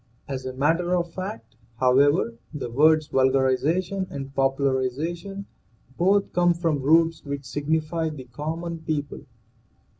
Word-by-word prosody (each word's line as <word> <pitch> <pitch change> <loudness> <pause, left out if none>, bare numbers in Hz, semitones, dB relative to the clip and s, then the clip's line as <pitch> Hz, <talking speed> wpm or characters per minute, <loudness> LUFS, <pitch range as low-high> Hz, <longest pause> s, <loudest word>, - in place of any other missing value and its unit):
As 130 -1 -4
a 130 - -5
matter 165 +7 +1
of 170 -1 -2
fact, 115 - -7 0.2
however, 130 +1 +3 0.2
the 140 -6 -5
words 155 +4 +4
vulgarization 140 +9 +1
and 135 -1 -7
popularization 140 +8 -1 0.5
both 195 +3 +2
come 175 -1 +3
from 165 -4 0
roots 165 +3 +3
which 140 -1 -5
signify 160 +3 -1
the 150 -4 -8
common 160 +7 -5
people. 155 -2 -4
155 Hz, 120 wpm, -25 LUFS, 135-170 Hz, 0.5 s, words